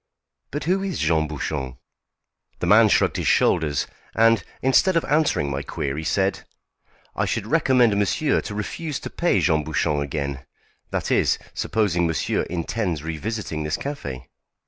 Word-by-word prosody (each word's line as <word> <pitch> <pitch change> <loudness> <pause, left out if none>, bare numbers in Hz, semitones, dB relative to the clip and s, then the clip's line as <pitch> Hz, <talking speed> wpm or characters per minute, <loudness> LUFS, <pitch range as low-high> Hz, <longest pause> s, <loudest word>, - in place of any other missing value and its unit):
"But 145 - -4
who 185 +4 +1
is 195 -3 -3
Jean 80 0 +1
Bouchon?" 65 -3 -4 0.8
The - - -3
man 105 +4 +6
shrugged - - +2
his - - -2
shoulders, 75 -6 +2 0.3
and, 115 +1 +4 0.2
instead 165 +7 +4
of 165 - 0
answering 145 - +1
my 70 +1 -2
query, 70 +2 -4
said: 95 +4 0 0.7
"I - - 0
should - - -2
recommend 125 -5 +3
monsieur 105 +9 +1
to 105 - -6
refuse 145 +8 -4
to - - -6
pay 170 - +1
Jean 80 -2 +2
Bouchon 75 -1 0
again 70 -2 -3 0.5
that - - -2
is, - - +3 0.2
supposing 90 -6 0
monsieur 80 - 0
intends 85 -2 -2
revisiting 80 +1 -4
this 75 0 -1
café." 70 - -5
90 Hz, 145 wpm, -23 LUFS, 75-120 Hz, 0.8 s, man